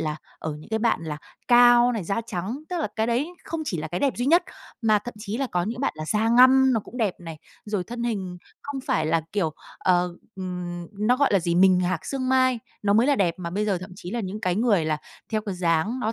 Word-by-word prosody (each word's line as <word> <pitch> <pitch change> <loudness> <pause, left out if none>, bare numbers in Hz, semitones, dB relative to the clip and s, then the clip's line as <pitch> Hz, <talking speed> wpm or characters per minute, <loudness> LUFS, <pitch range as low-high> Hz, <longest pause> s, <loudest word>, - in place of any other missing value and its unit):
là 155 0 -2 0.2
ở 155 -2 -4
những 155 +9 -14
cái 220 - +1
bạn 230 -4 +1
là 150 -2 -4 0.3
cao 240 0 +6
này, 215 -7 -3
da 200 +6 -1
trắng, 215 - -4
tức 355 -1 -2
là - - -1
cái 220 +1 +1
đấy 265 +9 0
không 325 -1 -4
chỉ 175 - -3
là 155 +1 -4
cái 175 - -3
đẹp 275 -3 +1
duy 245 +2 -1
nhất, 340 +4 +5 0.4
mà 215 -2 +4
thậm 240 +2 -8
chí 215 +2 -4
là 275 - 0
có 175 -6 -1
những 230 +6 -4
bạn 275 - 0
là 155 - -5
da 215 +6 +1
ngăm 260 +2 +6
nó 225 - +1
cũng 235 - -12
đẹp 215 -6 0
này. 165 -2 -8 0.3
Rồi 205 -4 -2
thân 240 0 -5
hình 190 -6 -3 0.2
không 285 -1 -5
phải 155 -10 0
là, 165 +1 +2
kiểu, 175 -7 0 0.3
ờ, 180 -1 +2 0.2
ừm, 180 -2 -5
nó 215 +5 +1
gọi 280 0 +3
là 195 - +5
gì, 170 0 0
mình 185 0 +5
hạc 180 -2 -1
xương 265 -2 -2
mai, 255 -1 +3 0.2
nó 200 0 +2
mới 230 +5 +4
là 290 - +4
đẹp, 175 -4 +1
mà 170 -2 -5
bây 205 +4 -1
giờ 195 -3 +1
thậm 185 +1 -9
chí 180 -2 -8
là 235 - -2
những 200 +2 -5
cái 180 -1 0
người 210 -8 +2
là 155 -1 0 0.3
theo 215 - +1
cái 195 - -2
dáng 175 +7 0
nó 225 -1 -1
210 Hz, 260 wpm, -25 LUFS, 180-245 Hz, 0.4 s, cao